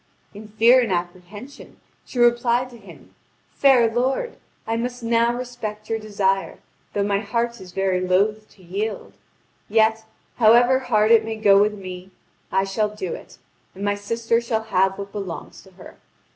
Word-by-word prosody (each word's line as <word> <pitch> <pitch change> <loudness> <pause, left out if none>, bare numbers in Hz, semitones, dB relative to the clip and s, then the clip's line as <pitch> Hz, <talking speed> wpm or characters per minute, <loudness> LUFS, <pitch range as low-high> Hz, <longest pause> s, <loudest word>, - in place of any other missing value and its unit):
In 210 +1 -11
fear 230 +4 +5
and 230 -5 -2
apprehension, 185 +8 -6 0.3
she - - -9
replied 240 +1 +2
to 240 - -12
him: 200 - -16 0.4
"Fair 260 -4 +4
lord, 260 - -1 0.3
I 225 - -1
must 245 +1 -4
now 230 0 +2
respect 225 -4 -6
your 225 - 0
desire, 200 -2 -1 0.4
though 200 - 0
my 200 0 0
heart 235 +3 -2
is 185 -1 -11
very 190 -1 0
loath 205 +4 0
to 190 - -20
yield. 205 +5 -4 0.6
Yet, 220 +1 +2 0.3
however 240 +3 +5
hard 220 -4 +2
it 225 -1 +6
may 220 0 -4
go 200 -2 +5
with 210 0 +1
me, 185 -1 -9 0.4
I 190 - +2
shall 200 +2 -1
do 205 -4 -5
it, - - -11 0.4
and 200 +2 -5
my 205 - +1
sister 230 +3 -1
shall 225 -2 -2
have 190 +1 +2
what 200 0 -7
belongs 195 -5 -7
to 190 - -19
her. 180 - -14
215 Hz, 165 wpm, -22 LUFS, 195-235 Hz, 0.6 s, it